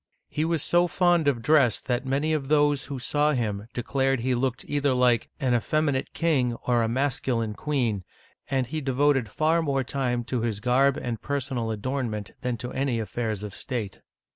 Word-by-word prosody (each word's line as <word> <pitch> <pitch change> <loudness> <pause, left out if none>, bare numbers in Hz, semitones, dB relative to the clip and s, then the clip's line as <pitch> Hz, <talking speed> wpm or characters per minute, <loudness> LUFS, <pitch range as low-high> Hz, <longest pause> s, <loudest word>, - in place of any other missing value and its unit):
He 155 - -1
was 165 -3 0
so 175 +1 +3
fond 175 -3 +2
of 120 -5 +1
dress 140 -4 +4
that 125 +1 -2
many 145 +4 +1
of 145 -3 -1
those 145 -1 +3
who 140 - -5
saw 150 +4 +1
him 105 -5 -2
declared 135 +1 0
he 130 +2 +1
looked 125 0 -1
either 145 -2 +1
like 125 -2 +3
'* - - -41
an 130 -2 +1
effeminate 140 +3 0
king 135 -8 +1
or 120 -1 +3
a 115 - +1
masculine 125 -3 0
queen," 120 -7 -1 0.5
and 135 -2 +1
he 155 +5 -4
devoted 135 -3 +2
far 160 +7 +2
more 140 -4 0
time 125 -2 -1
to 120 0 -2
his 110 -3 -2
garb 130 +4 +3
and 115 -3 -4
personal 135 -5 -2
adornment 110 -2 -3
than 125 -3 -2
to 125 +2 -6
any 130 -3 0
affairs 110 -1 -3
of 105 -2 -6
state. 115 -8 -5
130 Hz, 185 wpm, -26 LUFS, 120-145 Hz, 0.5 s, dress